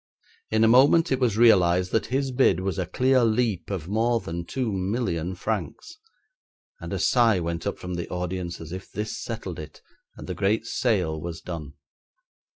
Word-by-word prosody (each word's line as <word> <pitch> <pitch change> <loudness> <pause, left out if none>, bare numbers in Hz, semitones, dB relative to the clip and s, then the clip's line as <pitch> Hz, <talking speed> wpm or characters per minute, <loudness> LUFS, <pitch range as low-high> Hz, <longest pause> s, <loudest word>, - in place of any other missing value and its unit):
In 110 0 +2
a - - +6
moment 135 +8 +5
it 130 - +2
was 120 -5 +1
realised 90 -6 +4
that 110 - 0
his 135 +2 -1
bid 125 -8 +3
was 95 -2 -2
a - - -2
clear 130 0 +2
leap 110 -4 0
of 90 -5 -4
more 115 +4 +1
than 85 -3 -5
two 130 -4 -2
million 95 -3 -2
francs, 110 - -4 0.8
and - - -7
a - - -1
sigh 115 -6 +3
went 85 0 -3
up - - -2
from 90 0 -6
the 85 -1 -4
audience 90 -1 -4
as 80 0 -9
if 95 +1 -7
this 105 +1 -4
settled 110 -8 -6
it, 75 -1 -10 0.3
and - - -9
the 90 - -4
great 105 +5 0
sale 90 -11 0
was 85 0 -6
done. 80 -5 -7
100 Hz, 180 wpm, -25 LUFS, 85-115 Hz, 0.8 s, a